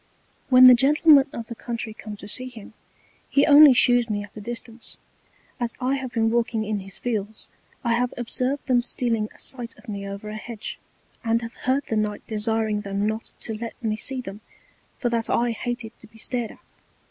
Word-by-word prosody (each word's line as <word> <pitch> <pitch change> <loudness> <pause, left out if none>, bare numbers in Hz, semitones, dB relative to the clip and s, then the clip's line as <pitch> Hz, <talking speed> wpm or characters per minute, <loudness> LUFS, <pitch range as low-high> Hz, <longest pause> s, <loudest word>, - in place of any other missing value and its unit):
When 255 -1 +8
the 255 - +11
Gentlemen 285 +2 +5
of 230 - -6
the 235 - -7
Country 230 -1 -5
come 215 -1 -9
to 200 - -10
see 255 +4 0
him, 225 -3 -12 0.6
he 280 - +4
only 290 0 +9
shews 245 -1 +4
me 205 -1 -2
at 205 - -14
a 215 - -8
distance: 235 +1 -7 0.6
As 240 -1 -2
I 260 +1 0
have 260 -2 -5
been 225 -1 +1
walking 230 -2 0
in 210 -1 -2
his 195 0 -7
Fields 220 -3 -4 0.3
I 235 -2 +2
have 245 +1 +1
observed 255 +3 -1
them 250 -2 +3
stealing 230 -3 -1
a - - -19
Sight 245 -1 -2
of - - -19
me 200 -2 -5
over 200 +2 -7
an 215 - -5
Hedge, 230 -1 -7 0.4
and 230 0 +1
have 230 +1 -7
heard 265 +2 0
the 220 - -1
Knight 210 -1 -2
desiring 220 -1 0
them 200 0 -2
not 220 +1 -3
to 225 - -4
let 230 +1 -6
me 215 -1 0
see 255 +4 -2
them, 200 -2 -9 0.6
for 240 - -1
that 230 -1 -1
I 240 0 +2
hated 240 0 -4
to 225 - -11
be 220 +1 -20
stared 235 0 -2
at. - - -17
230 Hz, 205 wpm, -24 LUFS, 215-250 Hz, 0.6 s, the